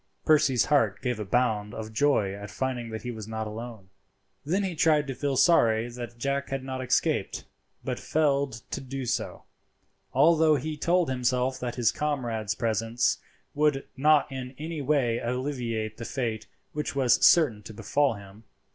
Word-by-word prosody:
Percy's 140 -5 +4
heart 115 -9 +2
gave 125 -3 -1
a 105 - -3
bound 105 -2 0
of 110 0 -7
joy 110 -6 +2
at 100 0 -8
finding 125 -1 -3
that 110 0 -6
he 125 - -4
was 110 -2 -8
not 110 0 -4
alone. 110 -2 -8 0.5
Then 185 +7 0
he 190 -2 -2
tried 155 -2 +3
to 135 - -4
feel 140 0 -2
sorry 115 -10 +4
that 120 -1 -8
Jack 140 +3 -2
had 135 -1 -3
not 130 -1 -4
escaped, 130 - 0 0.4
but - - -3
failed 140 -5 0
to - - -3
do 135 0 -5
so; - - -3 0.7
although 155 +3 +5
he 155 +3 -3
told 170 +3 +2
himself 130 0 0
that 125 -1 -4
his 120 -3 +2
comrade's 120 -9 -2
presence 115 +1 0 0.3
would 145 -2 +1
not 150 +1 +3
in 130 -1 -6
any 155 0 -5
way 130 -5 +1
alleviate 120 -4 -3
the 115 - -6
fate 115 -5 -3 0.3
which 150 -1 -3
was 130 -3 +3
certain 140 -11 +5
to 110 - -10
befall 140 +4 0
him. 100 +2 -13
125 Hz, 165 wpm, -27 LUFS, 115-145 Hz, 0.7 s, although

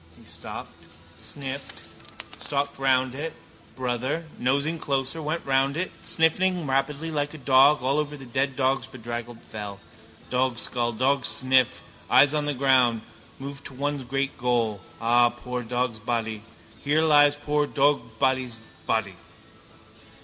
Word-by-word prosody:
He - - -18
stopped, - - -8 0.5
sniffed, 135 -1 -6 0.6
stalked 140 -1 -2
round 130 -1 +2
it, 155 +4 -4 0.4
brother, 130 +5 -2
nosing 140 +6 +1
closer, 135 +3 -1
went 155 +2 -3
round 135 +1 +2
it, 185 +2 -2
sniffling 175 +1 +2
rapidly 145 +4 -1
like 145 0 -2
a - - -7
dog 135 +1 +5
all 135 +3 +2
over 150 -1 -3
the 135 - -10
dead 130 +2 -1
dog's 135 0 +1
bedraggled 120 -1 -7
fell. 105 -2 -7 0.5
Dogskull, 125 -1 0
dogsniff, 130 0 +2 0.3
eyes 145 +1 +6
on 150 -1 0
the 145 - 0
ground, 130 -4 +3 0.4
moves 140 +1 -7
to 135 - -10
one 145 +2 -1
great 135 +2 -2
goal. 115 -5 0 0.2
Ah, 120 +1 +4
poor 125 +1 -5
dogsbody! 115 -2 -2 0.4
Here 150 +2 +2
lies 145 -2 +6
poor 145 0 0
dogsbody's 130 -3 +1 0.3
body. 100 -5 0
135 Hz, 130 wpm, -26 LUFS, 120-145 Hz, 0.6 s, eyes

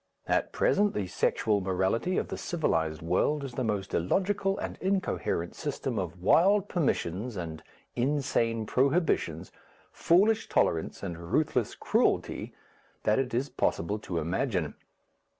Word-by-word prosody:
At - - 0
present 205 0 +2
the 105 - -1
sexual 100 +3 +1
morality 95 - 0
of - - -1
the - - -3
civilized 80 - -1
world 115 - +1
is 135 -3 -6
the 130 - -2
most 105 -4 -2
illogical 195 - +1
and - - -4
incoherent 180 - -1
system 135 -6 -3
of 90 -1 -5
wild 195 - +4
permissions 120 - -1
and 80 -3 -5 0.3
insane 120 -4 0
prohibitions, 130 - +1 0.4
foolish 210 +6 +3
tolerance 80 +4 0
and 85 -2 -6
ruthless 130 -7 +1
cruelty - - 0 0.5
that 105 +4 +3
it 130 -2 -1
is 130 +4 0
possible 105 -5 -1
to 90 -5 -4
imagine. 85 - -1
115 Hz, 130 wpm, -29 LUFS, -, 0.5 s, wild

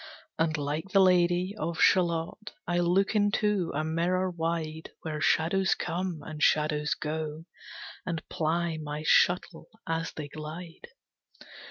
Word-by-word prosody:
And 160 -1 +1
like 150 +5 -3
the 195 - +4
Lady 180 0 +3
of 165 +1 -3
Shalott 175 +3 +2
I 175 0 0
look 180 +4 +2
into 205 -3 +2
a 155 - 0
mirror 175 +4 0
wide, 160 -2 -3
Where 155 -2 -4
shadows 185 +6 +2
come, 175 -3 -3
and 155 -1 -7
shadows 150 -1 +2
go, 155 +1 -4 0.6
And 165 -3 -4
ply 165 0 -1
my 150 0 -5
shuttle 175 0 +3 0.2
as 165 0 -2
they 150 -2 -6
glide. 155 - -8
165 Hz, 130 wpm, -28 LUFS, 155-180 Hz, 0.6 s, the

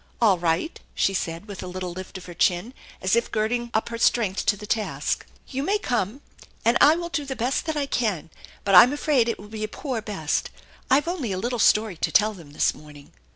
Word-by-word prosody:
"All 205 -6 +4
right," 170 - -1 0.2
she 195 - +2
said, 170 +1 -3
with 200 -2 -7
a 185 - -6
little 180 0 -5
lift 185 +1 -8
of 185 - -11
her 175 - -9
chin 180 +7 +1 0.3
as 190 +3 +3
if 235 - +1
girding 235 +2 -1
up 220 +1 0
her 230 0 -5
strength 215 -5 +1
to 205 - +3
the 210 - -9
task. 215 0 -2 0.2
"You 270 0 -3
may 395 +8 +1
come, 245 - -2 0.4
and 230 +1 +4
I'll 330 +4 +5
do 315 -4 -2
the 270 -1 -5
best 255 +6 -1
I 290 -1 0
can, 210 - -1 0.3
but 195 - 0
I'm 215 +9 +9
afraid 285 -5 +2
it 230 - -2
will 205 - -12
be 215 0 -6
a - - -1
poor 250 +1 -4
best. 195 -9 -2 0.4
I've 285 +4 +3
only 325 - -2
a 185 - -2
little 240 +5 -2
story 210 -4 +3
to - - -1
tell 215 +1 +4
them 165 -7 -13
this - - +2
morning." 150 -2 -14
215 Hz, 220 wpm, -24 LUFS, 185-250 Hz, 0.4 s, I'm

